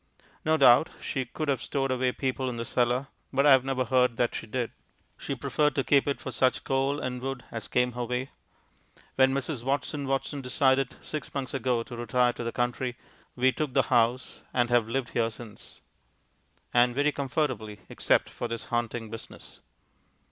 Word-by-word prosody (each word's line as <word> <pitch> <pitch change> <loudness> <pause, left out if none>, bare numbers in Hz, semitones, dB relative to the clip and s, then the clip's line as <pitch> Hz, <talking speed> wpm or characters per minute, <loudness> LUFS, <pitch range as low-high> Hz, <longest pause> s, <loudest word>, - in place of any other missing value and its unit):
No 160 0 +3
doubt 135 +1 +6
she 130 -1 -3
could 155 +5 -5
have 140 -2 +1
stowed 135 -1 -1 0.3
people 130 -1 -1
away - - 0
in 120 - -5
the 115 - -3
cellar, 125 +3 +1 0.2
but 140 +1 +2
I 145 - +7
have 130 -1 +7
never 130 -1 -1
heard 125 -1 +2
that 120 -1 +1
she - - -5
did; 120 +1 -2 0.4
she - - -4
preferred 150 -2 +1
to 135 - +1
keep 140 +1 +3
it 140 - 0
for - - -6
such 130 -1 +1
coal 135 +2 0
and 125 -2 -4
wood 135 -1 -4
as 115 -2 -5
came 125 0 +1
her 125 +1 -4
way. 125 +3 -3 0.8
When 130 0 +4
Mrs. 135 -1 -2
Watson 140 +1 -1
Watson 135 +1 -1
decided 130 0 +2
six 155 - -5
months 135 -2 -3
ago 125 -3 0
to 120 - -9
retire 120 +1 +1
to 120 - -6
the 115 - -2
country, 120 +1 -2 0.4
we 130 +1 +3
took 140 +1 -3
the 135 - +5
house, 120 +2 +1
and 120 -1 +2
have 120 -2 +3
lived 130 0 -1
here 115 -1 +1
since. 110 -1 -11 0.9
And 120 0 +4
very 145 +2 +3
comfortably, 130 -8 -2
except - - +2
for - - -5
this 115 -1 -4
haunting 120 -1 -2
business. 115 - -10
130 Hz, 185 wpm, -28 LUFS, 120-135 Hz, 0.9 s, I